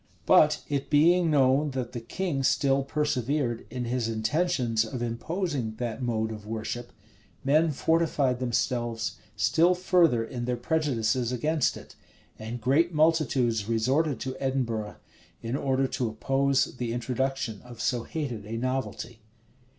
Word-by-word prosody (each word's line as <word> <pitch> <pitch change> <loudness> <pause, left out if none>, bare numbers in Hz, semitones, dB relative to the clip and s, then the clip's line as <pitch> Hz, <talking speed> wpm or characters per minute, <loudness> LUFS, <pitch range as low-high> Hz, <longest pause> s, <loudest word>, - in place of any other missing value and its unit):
But - - +5
it 140 -1 -2
being 165 +3 +4
known 140 0 +3
that 125 -2 -3
the 120 - -5
king 145 +4 -2
still 135 0 +2
persevered 140 -3 -1
in 125 0 -4
his 120 -1 -1
intentions 115 0 +1
of 120 +3 -5
imposing 130 - -2
that 120 +1 -4
mode 110 -3 -1
of 105 -1 -8
worship, 115 +2 -4 0.5
men 155 +4 +3
fortified 150 -4 +1
themselves 120 -2 -1 0.2
still 160 - +3
further 175 -10 +3
in 120 +1 -5
their 125 0 -1
prejudices 125 -4 0
against 150 +4 0
it; - - -13 0.4
and 115 +2 -5
great 145 +8 +2
multitudes 135 -9 +2
resorted 130 +6 +1
to 130 0 -4
Edinburgh, 120 -6 -2 0.5
in 115 +3 -2
order 135 -1 +1
to 125 -3 -1
oppose 135 +4 +1
the 120 -2 -2
introduction 125 -2 -2
of 120 -2 -12
so 120 +1 0
hated 125 -5 -4
a 115 +1 -4
novelty. 120 -2 -3
130 Hz, 135 wpm, -27 LUFS, 115-145 Hz, 0.5 s, But